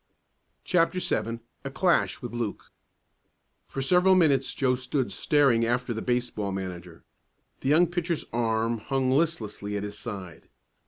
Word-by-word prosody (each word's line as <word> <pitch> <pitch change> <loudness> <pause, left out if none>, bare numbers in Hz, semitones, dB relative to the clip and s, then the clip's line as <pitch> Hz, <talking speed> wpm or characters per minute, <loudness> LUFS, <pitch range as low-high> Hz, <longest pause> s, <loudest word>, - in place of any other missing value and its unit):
CHAPTER 180 +1 +2
VII 115 -8 -1 0.2
A 135 - -4
CLASH 165 +1 +1
WITH 120 - -6
LUKE 115 -4 -4 1.0
For 135 - -4
several 180 +5 +5
minutes 140 -7 +3
Joe 130 -2 +2
stood 125 +1 -2
staring 140 -6 +3
after 120 +1 0
the 110 - -4
baseball 120 -5 -1
manager. 90 -3 -6 0.6
The 135 - -2
young 160 +4 +6
pitcher's 175 -1 -2
arm 115 0 0
hung 130 +2 0
listlessly 115 -9 -1
at 100 - -3
his 105 0 -7
side. 95 -7 -8
125 Hz, 140 wpm, -27 LUFS, 110-145 Hz, 1.0 s, young